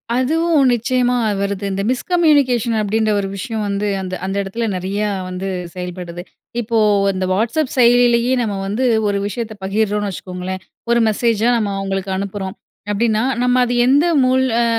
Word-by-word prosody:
அதுவும் 300 Hz, +2 st, +2 dB
நிச்சயமா 250 Hz, +1 st, +1 dB, 0.2 s
வருது. 200 Hz, 0 st, -2 dB
இந்த 195 Hz, +1 st, -2 dB
மிஸ்கம்யூனிகேஷன் 265 Hz, -, +2 dB
அப்டின்ற 215 Hz, +1 st, +1 dB
ஒரு 195 Hz, -, -2 dB
விஷயம் 220 Hz, +2 st, -4 dB
வந்து 200 Hz, +1 st, -1 dB
அந்த, 185 Hz, -1 st, -6 dB
அந்த 195 Hz, +1 st, -3 dB
எடத்துல 200 Hz, +4 st, -3 dB
நெறையா 200 Hz, +3 st, -2 dB, 0.2 s
வந்து 185 Hz, +1 st, -4 dB, 0.3 s
செயல்படுது. 180 Hz, -1 st, -6 dB, 0.4 s
இப்போ 230 Hz, 0 st, -1 dB, 0.3 s
வந்த 190 Hz, -1 st, -1 dB
வாட்ஸ்அப் 235 Hz, +8 st, 0 dB
செயலியிலேயே 245 Hz, 0 st, +4 dB
நம்ம 215 Hz, -4 st, -2 dB
வந்து 210 Hz, +6 st, -1 dB, 0.3 s
ஒரு 200 Hz, -, 0 dB
விஷயத்த 225 Hz, +1 st, -5 dB
பகிர்றோனு 205 Hz, +1 st, 0 dB
வச்சுக்கங்களேன். 185 Hz, 0 st, -6 dB, 0.3 s
ஒரு 235 Hz, 0 st, +4 dB
மெசேஜா 225 Hz, +1 st, +1 dB
நம்ம 210 Hz, -3 st, -1 dB
அவங்களுக்கு 195 Hz, 0 st, -3 dB
அனுப்புறோம். 195 Hz, -1 st, -4 dB, 0.4 s
அப்டின்னா 220 Hz, +1 st, +1 dB, 0.2 s
நம்ம 250 Hz, 0 st, +3 dB
அது 245 Hz, -, -2 dB
எந்த 285 Hz, +5 st, +4 dB, 0.2 s
மூல் 260 Hz, +1 st, +3 dB, 0.2 s
அ -, -, +3 dB
215 Hz, 145 wpm, -18 LUFS, 195-245 Hz, 0.4 s, செயலியிலேயே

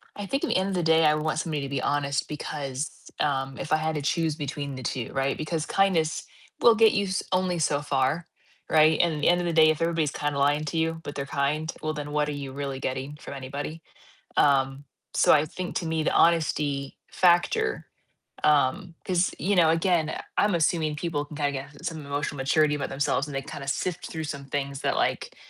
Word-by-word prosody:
I 205 Hz, -, -5 dB
think 275 Hz, +8 st, -2 dB
at -, -, 0 dB
the -, -, +2 dB
end 190 Hz, +1 st, 0 dB
of 195 Hz, -, -2 dB
the 175 Hz, -, 0 dB
day 160 Hz, 0 st, +4 dB
I 150 Hz, 0 st, +5 dB
want 155 Hz, +1 st, -1 dB
somebody 155 Hz, -4 st, -2 dB
to 140 Hz, -, -4 dB
be 135 Hz, -2 st, -2 dB
honest 140 Hz, 0 st, 0 dB
because, 145 Hz, -1 st, -4 dB, 0.3 s
um, 135 Hz, -2 st, -1 dB
if -, -, -6 dB
I 155 Hz, -, +5 dB
had 155 Hz, 0 st, -1 dB
to 150 Hz, -, -2 dB
choose 160 Hz, +1 st, 0 dB
between 140 Hz, -2 st, -4 dB
the 130 Hz, -, -7 dB
2, 120 Hz, -1 st, -3 dB
right, 135 Hz, 0 st, 0 dB
because 155 Hz, 0 st, -2 dB
kindness 175 Hz, -5 st, +1 dB, 0.4 s
will 235 Hz, -1 st, +7 dB
get 225 Hz, 0 st, +5 dB
you 200 Hz, 0 st, +1 dB
s 190 Hz, 0 st, -1 dB
only 185 Hz, -1 st, +1 dB
so 145 Hz, -2 st, +1 dB
far, 145 Hz, +3 st, 0 dB, 0.4 s
right, 155 Hz, 0 st, +5 dB
and 170 Hz, -2 st, +1 dB
at 150 Hz, -, -4 dB
the -, -, +2 dB
end 175 Hz, 0 st, +3 dB
of 175 Hz, -, -2 dB
the 170 Hz, -, -1 dB
day, 155 Hz, -1 st, +6 dB
if 155 Hz, 0 st, 0 dB
everybody's 165 Hz, -3 st, +1 dB
kinda 145 Hz, -1 st, -2 dB
lying 145 Hz, +2 st, +2 dB
to 155 Hz, +2 st, -3 dB
you, 160 Hz, 0 st, 0 dB
but 145 Hz, -, -7 dB
they're 140 Hz, -, -3 dB
kind, 150 Hz, +4 st, -1 dB
well, 155 Hz, 0 st, -2 dB
then 150 Hz, -1 st, -5 dB
what 150 Hz, 0 st, +1 dB
are -, -, -1 dB
you 140 Hz, -2 st, -5 dB
really 140 Hz, -1 st, -4 dB
getting 135 Hz, +2 st, -4 dB
from -, -, -9 dB
anybody? 140 Hz, +4 st, -6 dB, 0.6 s
Um, 135 Hz, 0 st, +3 dB, 0.3 s
so -, -, +5 dB
I 150 Hz, -, +5 dB
think 180 Hz, +3 st, -6 dB
to 170 Hz, -, -1 dB
me 160 Hz, -1 st, 0 dB
the -, -, +1 dB
honesty 150 Hz, -4 st, +2 dB
factor 185 Hz, -, +2 dB, 0.6 s
um, 150 Hz, +5 st, +2 dB
'cause, 180 Hz, 0 st, +1 dB
you 200 Hz, +1 st, +1 dB
know, 165 Hz, -3 st, +5 dB
again, 165 Hz, -2 st, +1 dB, 0.2 s
I'm 205 Hz, -1 st, +3 dB
assuming 160 Hz, -2 st, +1 dB
people 150 Hz, -2 st, -2 dB
can 150 Hz, -, -11 dB
kinda 145 Hz, -1 st, 0 dB
get 140 Hz, +1 st, -8 dB
some 155 Hz, -3 st, -4 dB
emotional 145 Hz, 0 st, -3 dB
maturity 150 Hz, +3 st, +2 dB
about 140 Hz, -, -3 dB
themselves, 140 Hz, +1 st, 0 dB
and 145 Hz, -, -7 dB
they 135 Hz, -, -1 dB
kinda 140 Hz, 0 st, -8 dB
sift 180 Hz, +5 st, -2 dB
through 160 Hz, -1 st, -5 dB
some 140 Hz, -2 st, -6 dB
things 140 Hz, 0 st, -3 dB
that, -, -, 0 dB
like, -, -, -1 dB
150 Hz, 220 wpm, -26 LUFS, 140-165 Hz, 0.6 s, will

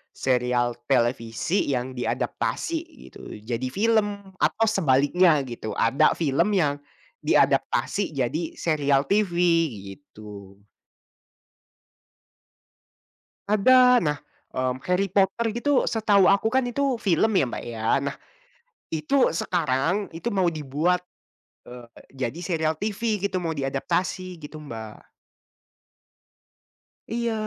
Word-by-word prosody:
serial 125 Hz, -1 st, 0 dB
televisi 120 Hz, -, 0 dB
yang 130 Hz, -1 st, -2 dB
diadaptasi 320 Hz, -, -2 dB, 0.2 s
gitu -, -, -11 dB
jadi 120 Hz, +3 st, -3 dB
film 205 Hz, -, 0 dB
atau 225 Hz, +2 st, +2 dB
sebaliknya 165 Hz, -3 st, +3 dB
gitu. 120 Hz, -3 st, -6 dB
Ada 115 Hz, +4 st, +3 dB
film 170 Hz, +6 st, +1 dB
yang 145 Hz, -5 st, +1 dB, 0.4 s
diadaptasi 195 Hz, -6 st, +1 dB
jadi 155 Hz, +6 st, -2 dB
serial 145 Hz, -4 st, +1 dB
TV 205 Hz, -1 st, +1 dB, 0.6 s
gitu. 105 Hz, -6 st, -13 dB, 2.9 s
Ada. 250 Hz, +4 st, +5 dB
Nah, 150 Hz, -2 st, 0 dB, 0.3 s
mmm, 130 Hz, 0 st, -2 dB
Harry 180 Hz, +2 st, +1 dB
Potter 200 Hz, +4 st, +1 dB
gitu 275 Hz, +3 st, +1 dB
setahu 205 Hz, -4 st, +3 dB
aku 200 Hz, +3 st, +3 dB
kan 260 Hz, -1 st, +1 dB
itu 260 Hz, -1 st, -1 dB
film 205 Hz, +1 st, +2 dB
ya, -, -, +3 dB
Mbak, -, -, -6 dB
ya. 115 Hz, -1 st, -7 dB, 0.2 s
Nah, 140 Hz, 0 st, -3 dB, 0.8 s
itu 155 Hz, -, -3 dB, 0.2 s
sekarang 165 Hz, +3 st, -1 dB
itu 165 Hz, +6 st, -11 dB
mau 185 Hz, -3 st, +2 dB
dibuat, 155 Hz, +4 st, 0 dB, 0.7 s
eee, 120 Hz, -1 st, -10 dB, 0.4 s
jadi 130 Hz, +8 st, -5 dB
serial 160 Hz, -3 st, 0 dB
TV 210 Hz, +3 st, -2 dB
gitu, 200 Hz, -1 st, -1 dB
mau 165 Hz, -2 st, -2 dB
diadaptasi 160 Hz, +6 st, -3 dB
gitu, 150 Hz, +1 st, -9 dB
Mbak. 115 Hz, -8 st, -9 dB, 2.0 s
Iya. 235 Hz, 0 st, -1 dB
165 Hz, 105 wpm, -24 LUFS, 130-200 Hz, 2.9 s, Ada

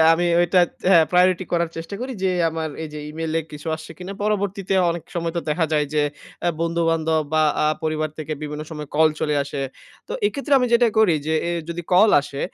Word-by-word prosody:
আমি 175 Hz, +2 st, +1 dB
ওইটা 175 Hz, +1 st, +4 dB, 0.2 s
তে -, -, -4 dB
হ্যাঁ, 170 Hz, -4 st, +7 dB
প্রায়োরিটি 180 Hz, +1 st, +4 dB
করার 170 Hz, -1 st, +1 dB
চেষ্টা 165 Hz, +3 st, -6 dB
করি 260 Hz, +1 st, -4 dB
যে, 190 Hz, -, +2 dB, 0.2 s
আমার 160 Hz, 0 st, -3 dB
এই 160 Hz, -, -5 dB
যে, -, -, -5 dB
ই-মেইলে 160 Hz, +1 st, -2 dB
কিছু 150 Hz, +1 st, -9 dB
আসছে 160 Hz, +1 st, -10 dB
কিনা? 180 Hz, +2 st, -6 dB
পরবর্তীতে 200 Hz, -2 st, -1 dB, 0.2 s
অনেক 170 Hz, -1 st, -4 dB
সময় 165 Hz, -1 st, -2 dB
তো -, -, +1 dB
দেখা 160 Hz, +2 st, +1 dB
যায় 150 Hz, -1 st, +2 dB
যে, 150 Hz, -, +3 dB, 0.4 s
অ্যা 175 Hz, -, +2 dB
বন্ধু-বান্ধব 165 Hz, -1 st, +1 dB
বা 155 Hz, -, +4 dB, 0.2 s
আ -, -, +3 dB, 0.2 s
পরিবার 155 Hz, -1 st, -1 dB
থেকে 155 Hz, 0 st, -4 dB
বিভিন্ন 150 Hz, 0 st, -5 dB
সময় 150 Hz, -2 st, -7 dB
কল 160 Hz, 0 st, +6 dB
চলে 150 Hz, -1 st, 0 dB
আসে। 140 Hz, 0 st, -5 dB, 0.5 s
তো -, -, -5 dB
এক্ষেত্রেও 280 Hz, -5 st, +1 dB
আমি 250 Hz, -, +1 dB
যেটা 235 Hz, 0 st, +5 dB
করি 210 Hz, -7 st, +5 dB
যে, 160 Hz, -, +1 dB
এ -, -, 0 dB, 0.2 s
যদি 170 Hz, +1 st, -4 dB
কল 205 Hz, +4 st, +6 dB
আসে, 140 Hz, 0 st, -7 dB
165 Hz, 210 wpm, -22 LUFS, 155-185 Hz, 0.5 s, হ্যাঁ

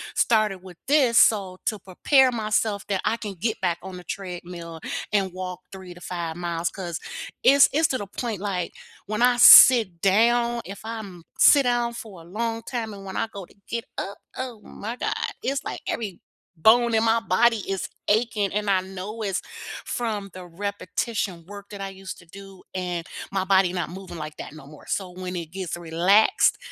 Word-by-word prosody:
started 215 Hz, -4 st, +2 dB
with 180 Hz, -2 st, -12 dB
this 270 Hz, -6 st, +4 dB
so 195 Hz, -4 st, +4 dB
to 215 Hz, -3 st, -1 dB
prepare 255 Hz, +8 st, +3 dB
myself 215 Hz, -2 st, -1 dB
that 195 Hz, -2 st, 0 dB
I 230 Hz, -, +1 dB
can 210 Hz, -3 st, -6 dB
get 215 Hz, +5 st, -2 dB
back 175 Hz, -2 st, 0 dB
on 185 Hz, 0 st, -8 dB
the 180 Hz, -, -10 dB
treadmill 175 Hz, -3 st, -7 dB, 0.3 s
and 195 Hz, -3 st, +1 dB
walk 185 Hz, -1 st, -6 dB
3 185 Hz, -2 st, -10 dB
to 175 Hz, -, -14 dB
5 170 Hz, -3 st, -4 dB
miles 170 Hz, -1 st, -2 dB
'cause 175 Hz, -4 st, -5 dB, 0.4 s
it's 280 Hz, +1 st, +7 dB
it's 315 Hz, +2 st, +3 dB
to 260 Hz, -, 0 dB
the 205 Hz, -, -5 dB
point, 220 Hz, 0 st, -4 dB
like, 185 Hz, -3 st, -2 dB, 0.4 s
when 215 Hz, +3 st, 0 dB
I 245 Hz, 0 st, +4 dB
sit 225 Hz, -7 st, +9 dB
down 235 Hz, +4 st, +3 dB
if 195 Hz, +1 st, -8 dB
I'm 205 Hz, -6 st, -7 dB, 0.2 s
sit 280 Hz, -2 st, +7 dB
down 240 Hz, -1 st, +1 dB
for 205 Hz, -7 st, -9 dB
a -, -, -15 dB
long 225 Hz, +5 st, -3 dB
time 225 Hz, -2 st, -4 dB
and 200 Hz, -1 st, -10 dB
when 190 Hz, -1 st, -6 dB
I -, -, +1 dB
go 195 Hz, -3 st, -7 dB
to -, -, -22 dB
get 235 Hz, 0 st, -3 dB
up, 200 Hz, -, -5 dB, 0.2 s
oh, 250 Hz, -4 st, -5 dB
my 225 Hz, +3 st, -7 dB
God, -, -, -2 dB, 0.3 s
it's, 275 Hz, +1 st, -2 dB
like, -, -, -5 dB
every 205 Hz, -6 st, -3 dB, 0.4 s
bone 235 Hz, +4 st, +5 dB
in 220 Hz, 0 st, +3 dB
my 225 Hz, 0 st, +3 dB
body 235 Hz, 0 st, +3 dB
is 195 Hz, -1 st, -2 dB, 0.2 s
aching 215 Hz, -2 st, +1 dB
and 210 Hz, 0 st, -1 dB
I 190 Hz, -2 st, +3 dB
know 195 Hz, +4 st, -7 dB
it's 195 Hz, -3 st, -1 dB, 0.4 s
from 215 Hz, -4 st, -3 dB
the 185 Hz, -1 st, -9 dB
repetition 195 Hz, 0 st, -3 dB
work 200 Hz, 0 st, -10 dB
that 205 Hz, -, -9 dB
I 195 Hz, -, -4 dB
used 195 Hz, 0 st, -8 dB
to 180 Hz, -, -17 dB
do 195 Hz, +2 st, -13 dB
and 180 Hz, -2 st, -3 dB, 0.2 s
my 190 Hz, -1 st, -1 dB
body 190 Hz, -2 st, +4 dB
not 180 Hz, -3 st, -3 dB
moving, 185 Hz, -1 st, -9 dB
like, 155 Hz, -1 st, -6 dB
that -, -, -7 dB
no 155 Hz, -3 st, -12 dB
more 150 Hz, 0 st, -14 dB
so 190 Hz, -3 st, -2 dB
when 185 Hz, 0 st, -6 dB
it 165 Hz, -2 st, -6 dB
gets 185 Hz, -2 st, -4 dB
relaxed, 175 Hz, -, +3 dB
195 Hz, 195 wpm, -24 LUFS, 180-225 Hz, 0.4 s, sit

